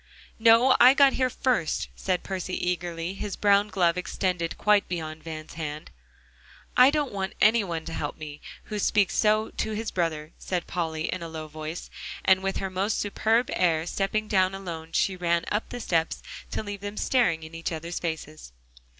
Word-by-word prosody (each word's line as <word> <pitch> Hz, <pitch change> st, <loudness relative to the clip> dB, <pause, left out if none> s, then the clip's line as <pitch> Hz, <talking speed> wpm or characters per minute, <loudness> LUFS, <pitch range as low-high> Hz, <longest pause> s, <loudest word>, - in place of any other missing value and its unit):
"No, 230 Hz, +3 st, +6 dB
I 255 Hz, +2 st, +8 dB
got 280 Hz, -1 st, +6 dB
here 255 Hz, -1 st, +1 dB
first," 245 Hz, -10 st, 0 dB
said 185 Hz, -2 st, -1 dB
Percy 185 Hz, -1 st, -4 dB
eagerly, 175 Hz, -1 st, -2 dB
his 200 Hz, 0 st, -5 dB
brown 205 Hz, 0 st, +4 dB
glove 180 Hz, -4 st, +1 dB
extended 180 Hz, -2 st, -2 dB
quite 210 Hz, -1 st, +3 dB
beyond 160 Hz, -3 st, -4 dB
Van's 155 Hz, -1 st, -8 dB
hand. 155 Hz, -2 st, -6 dB, 0.8 s
"I 250 Hz, +1 st, +8 dB
don't 295 Hz, -2 st, 0 dB
want 195 Hz, -1 st, -3 dB
any 220 Hz, +1 st, +5 dB
one 165 Hz, -4 st, -4 dB
to 165 Hz, -, -6 dB
help 145 Hz, -2 st, -4 dB
me, 150 Hz, -1 st, -8 dB, 0.2 s
who 210 Hz, -1 st, -5 dB
speaks 200 Hz, -2 st, +2 dB
so 215 Hz, +1 st, +2 dB
to 220 Hz, -, -3 dB
his 220 Hz, +1 st, -3 dB
brother," 160 Hz, -3 st, -2 dB
said 180 Hz, -2 st, -2 dB
Polly 160 Hz, -3 st, -3 dB
in 185 Hz, -, -5 dB
a 165 Hz, -, -5 dB
low 160 Hz, -1 st, -6 dB
voice, 155 Hz, +2 st, -7 dB, 0.3 s
and 190 Hz, 0 st, +5 dB
with 195 Hz, 0 st, -1 dB
her 195 Hz, -1 st, -3 dB
most 195 Hz, +3 st, 0 dB
superb 225 Hz, +5 st, +1 dB
air 165 Hz, -3 st, +2 dB
stepping 205 Hz, +4 st, -1 dB
down 190 Hz, -2 st, +2 dB
alone, 165 Hz, -4 st, -7 dB
she 190 Hz, -, +2 dB
ran 170 Hz, -1 st, 0 dB
up 210 Hz, +2 st, -1 dB
the 245 Hz, -, -6 dB
steps 165 Hz, -7 st, 0 dB, 0.3 s
to -, -, -3 dB
leave 205 Hz, -1 st, -6 dB
them 205 Hz, +1 st, -6 dB
staring 180 Hz, -11 st, +2 dB
in 160 Hz, +1 st, -10 dB
each 165 Hz, +1 st, -4 dB
other's 165 Hz, +1 st, -4 dB
faces. 155 Hz, -, -5 dB
185 Hz, 185 wpm, -26 LUFS, 165-210 Hz, 0.8 s, I